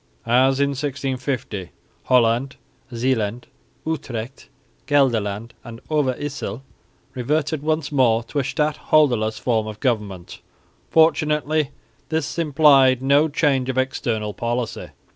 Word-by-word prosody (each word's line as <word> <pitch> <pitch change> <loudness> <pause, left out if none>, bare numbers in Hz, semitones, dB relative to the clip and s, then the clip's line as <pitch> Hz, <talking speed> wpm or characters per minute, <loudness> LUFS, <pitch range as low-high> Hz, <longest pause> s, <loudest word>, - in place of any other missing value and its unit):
As 130 +3 +3
in 140 0 +2
1650, 130 - -3 0.4
Holland, 125 +2 +2 0.4
Zeeland, 120 -2 -1 0.4
Utrecht, 130 -6 -5 0.4
Gelderland 115 -6 +1
and 115 -1 -9
Overyssel 135 -5 -2 0.5
reverted 145 +4 -1
once 155 -1 -1
more 120 -5 +3
to 145 +5 -3
a - - 0
stadholderless 135 -6 +1
form 110 -2 0
of 105 -1 -7
government. 105 -8 -3 0.5
Fortunately 155 -2 +2 0.4
this 160 0 -2
implied 140 -4 +4
no 140 +3 +4
change 140 -4 +1
of 130 - -2
external 115 -5 -1
policy. 120 +1 -3
130 Hz, 105 wpm, -22 LUFS, 115-145 Hz, 0.5 s, implied